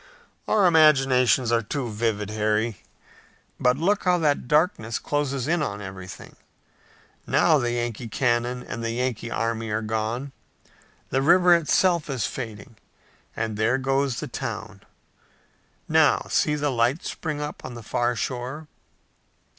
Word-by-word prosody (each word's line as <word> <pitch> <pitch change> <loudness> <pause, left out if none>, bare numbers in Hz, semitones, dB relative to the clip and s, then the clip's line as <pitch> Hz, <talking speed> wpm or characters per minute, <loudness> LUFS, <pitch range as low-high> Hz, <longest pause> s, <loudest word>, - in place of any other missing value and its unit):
"Our 210 -3 +3
imaginations 135 -7 +4
are 115 -1 +3
too 125 +4 -3
vivid, 105 -1 -2
Harry. 110 -2 -1 0.8
But 125 +1 +3
look 195 +7 +1
how 180 -1 +4
that 150 -6 0
darkness 150 - +1
closes 140 -3 -2
in 170 0 +1
on 100 -8 -3
everything! 95 -3 -9 0.9
Now - - +4
the 120 0 -1
Yankee 120 -1 -3
cannon 120 +1 0
and 115 - -6
the 115 - -1
Yankee 120 -1 -2
army 115 -1 -2
are 105 +1 -1
gone! 110 +5 -3 0.8
The 135 - +1
river 175 +4 +5
itself 170 0 +2
is 130 -8 -1
fading, 110 -2 -7 0.6
and 110 -1 -3
there 115 +4 +2
goes 135 -1 0
the - - -5
town! - - -6 1.1
Now, - - +3
see 150 - +2
the 145 -1 -1
lights 125 +5 0
spring 155 -3 -4
up 150 0 -6
on 125 -2 -7
the 120 - -9
far 120 +3 0
shore!" 130 +6 -4
125 Hz, 140 wpm, -24 LUFS, 115-145 Hz, 1.1 s, river